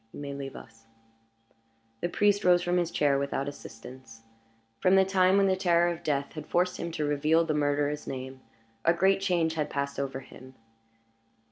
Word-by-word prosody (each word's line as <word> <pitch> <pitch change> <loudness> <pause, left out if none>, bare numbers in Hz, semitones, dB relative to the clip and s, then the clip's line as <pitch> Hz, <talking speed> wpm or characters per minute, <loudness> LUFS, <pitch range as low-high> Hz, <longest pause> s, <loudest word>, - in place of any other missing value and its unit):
"You - - -9
may 140 -1 -5
leave 140 -1 -7
us." 115 0 -14 1.1
The 175 - -2
priest 205 +2 +2
rose 175 -1 +4
from 175 0 +1
his 175 -2 0
chair 140 -4 +1
without 140 0 -2
assistance. 125 -4 -11 0.6
From 185 +8 +4
the 190 0 +5
time 190 0 +3
when 200 - +4
the 190 -1 +2
terror 175 -2 +2
of 170 - -10
death 140 -3 -2
had 155 -2 -8
forced 180 +1 0
him 170 - -4
to 150 - -2
reveal 155 +3 +2
the 155 - -1
murderer's 145 0 0
name 130 0 -6 0.4
a 170 - +4
great 195 +2 +3
change 175 -4 +1
had 155 -2 -2
passed 140 0 -3
over 135 -1 -3
him. 130 0 -14
150 Hz, 180 wpm, -28 LUFS, 140-175 Hz, 1.1 s, the